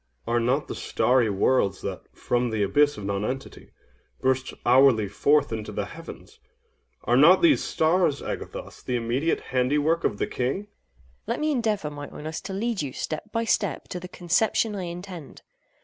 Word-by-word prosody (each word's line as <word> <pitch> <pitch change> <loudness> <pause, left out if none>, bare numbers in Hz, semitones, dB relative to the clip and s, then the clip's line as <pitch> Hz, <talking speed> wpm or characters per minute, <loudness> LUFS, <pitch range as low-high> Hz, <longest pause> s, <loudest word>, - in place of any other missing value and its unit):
OINOS. 115 - -1
Are 120 - +3
not 130 +5 0
the - - -4
starry 125 -3 +2
worlds 100 +1 +1
that, - - -4
from 120 0 -1
the 110 -2 0
abyss 145 +8 +3
of 105 - -6
nonentity, 105 +7 -4 0.5
burst 130 0 0
hourly 125 -4 +5
forth 145 +8 +2
into 110 -1 -5
the - - -3
heavens—are 65 - -8
not 165 - +6
these 325 -3 +5
stars, 160 -2 +2
Agathos, - - -6
the 125 - -2
immediate 120 +7 0
handiwork 150 +6 +2
of 105 - 0
the - - 0
King? 130 +10 -2
AGATHOS. 210 - -17 0.6
Let - - -1
me 305 0 +1
endeavor, 215 - -1
my 145 -1 -7
Oinos, 155 +1 -6
to 195 - -5
lead 220 0 -1
you, 140 -3 -4
step 165 +7 -5
by 230 - 0
step, 205 -5 0
to 180 - -4
the 180 - -8
conception 210 +5 +1
I 190 -2 -4
intend. 175 -3 -8
145 Hz, 170 wpm, -25 LUFS, 125-180 Hz, 0.6 s, not